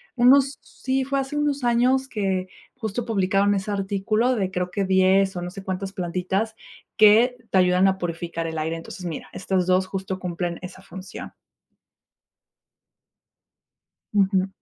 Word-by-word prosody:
unos, 265 +2 +5
sí, 265 0 -2
fue 275 +1 0
hace 270 +2 -3
unos 290 -2 0
años 250 +3 +2
que 190 -4 -1 0.3
justo 225 -1 -4
publicaron 200 -2 +2
ese 195 +2 -3
artículo 205 +5 0
de 190 -4 -1
creo 180 -1 -2
que 195 +1 -1
10 190 0 +3
o 175 - -3
no 175 - -4
sé 195 +1 -8
cuántas 190 +1 -4
plantitas 185 +4 -2 0.4
que 225 +4 +6
te - - +3
ayudan 180 +1 +4
a 190 0 +1
purificar 170 -1 -4
el 160 - -5
aire. 160 +1 -2
Entonces 180 +2 -9
mira, 165 -3 -5
estas 185 -1 -1
dos 185 +1 +3
justo 190 -1 -4
cumplen 175 -1 -3
esa 180 +1 -9
función. 190 0 -9 2.8
Ujú. 195 -1 +2
195 Hz, 150 wpm, -24 LUFS, 185-225 Hz, 2.8 s, que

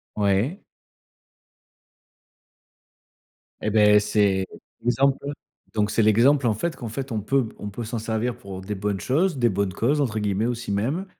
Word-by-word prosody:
Ouais. 105 - +1 3.0
Eh 110 - -1
beh 105 -1 +6
c'est 100 -2 +1 0.4
l'exemple, 135 +3 +2
heu, - - -2 0.4
donc 105 -1 +1
c'est 110 +2 +2
l'exemple, 120 +6 +4
en 110 - +2
fait 165 +10 -2
qu'en 120 - -6
fait 130 +3 -5
on 110 - -1
peut 130 +4 +1
p - - -15
on 105 - -6
peut 115 +4 -6
s'en 115 +2 -4
servir 115 +2 -2
pour 100 -5 -8
des 100 +2 -5
bonnes 100 0 -2
choses, 160 +4 +1
des 120 -1 +3
«bonnes 100 -2 -1
causes» 140 +10 +1
entre 115 -6 0
guillemets, 105 +1 0
aussi 120 -3 -3
même. 135 - -1
110 Hz, 165 wpm, -24 LUFS, 105-130 Hz, 3.0 s, beh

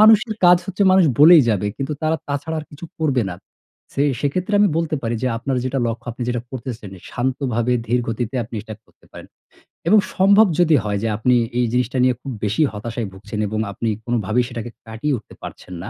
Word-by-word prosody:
মানুষের 220 +1 +6
কাজ 175 0 +8
হচ্ছে, 195 +1 -1
মানুষ 190 -1 +5
বলেই 160 +1 +9
যাবে। 105 -1 0
কিন্তু 140 +2 -3
তারা 160 +1 +1
তাছাড়া 145 +3 -3
আর - - -10
কিছু 150 +3 -10
করবে 140 -6 +1
না। - - -5 0.6
ছে 140 - 0 0.2
সেক্ষেত্রে 180 +8 -1
আমি 205 - +5
বলতে 165 -2 -1
পারি 115 0 -1
যে, - - +1
আপনার 130 +2 -2
যেটা 130 +1 -1
লক্ষ্য, 115 +1 -4
আপনি 120 - -7
যেটা 120 -1 -1
করতেছেন, 120 -5 -7 0.2
শান্তভাবে, 125 -1 -1
ধীর 120 +3 +1
গতিতে 115 +1 -3
আপনি 115 - -11
সেটা 110 0 -8
করতে - - -27
পারেন। - - -11 0.6
এবং 210 +3 +6 0.2
সম্ভব 200 +3 +6
যদি 165 -3 +5
হয় 100 -1 -1
যে, - - +1
আপনি 125 +3 +2 0.2
এই 125 - +3
জিনিসটা 125 +1 0
নিয়ে 125 -1 +3
খুব 135 - -6
বেশি 105 +7 0
হতাশায় 115 +1 -4
ভুগছেন 105 +2 -7
এবং 110 +1 -3
আপনি 115 +3 -2 0.2
কোনোভাবেই 120 0 0
সেটাকে 120 -1 -6 0.2
কাটিয়ে 115 +6 -2
উঠতে 110 - -14
পারছেন 90 - -9
না, 105 - -6
125 Hz, 200 wpm, -20 LUFS, 115-155 Hz, 0.6 s, বলেই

